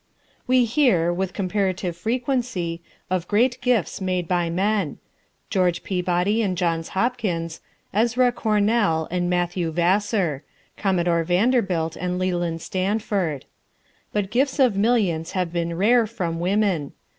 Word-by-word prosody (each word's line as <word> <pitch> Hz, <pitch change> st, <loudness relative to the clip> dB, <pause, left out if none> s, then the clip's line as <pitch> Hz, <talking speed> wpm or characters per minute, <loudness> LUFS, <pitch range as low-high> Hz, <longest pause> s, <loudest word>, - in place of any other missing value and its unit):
] -, -, -37 dB
We 255 Hz, -1 st, +5 dB
hear, 225 Hz, -, +2 dB
with 190 Hz, +1 st, -2 dB
comparative 190 Hz, -2 st, -1 dB
frequency, 230 Hz, -5 st, -2 dB, 0.3 s
of 185 Hz, -2 st, -1 dB
great 240 Hz, +4 st, +2 dB
gifts 240 Hz, -7 st, 0 dB
made 185 Hz, -2 st, -1 dB
by 175 Hz, -1 st, 0 dB
men: 200 Hz, +5 st, 0 dB, 0.5 s
George 180 Hz, -3 st, +1 dB
Peabody 180 Hz, +3 st, 0 dB
and 190 Hz, -4 st, -1 dB
Johns 165 Hz, -2 st, -1 dB
Hopkins, 190 Hz, -8 st, -1 dB, 0.3 s
Ezra 240 Hz, +4 st, +3 dB
Cornell 210 Hz, -7 st, +1 dB
and 175 Hz, 0 st, 0 dB
Matthew 175 Hz, -1 st, 0 dB
Vassar, 175 Hz, -, +1 dB, 0.3 s
Commodore 175 Hz, -4 st, +1 dB
Vanderbilt 180 Hz, -3 st, +1 dB
and 180 Hz, 0 st, -2 dB
Leland 175 Hz, -3 st, -1 dB
Stanford. 190 Hz, -6 st, -1 dB, 0.7 s
But 205 Hz, -1 st, -2 dB
gifts 265 Hz, +4 st, +1 dB
of 255 Hz, -7 st, +4 dB
millions 200 Hz, -7 st, +1 dB
have 180 Hz, -3 st, -1 dB
been 170 Hz, -1 st, -2 dB
rare 225 Hz, +4 st, +4 dB
from 175 Hz, -7 st, -3 dB
women. 185 Hz, -5 st, 0 dB
185 Hz, 125 wpm, -23 LUFS, 170-220 Hz, 0.7 s, We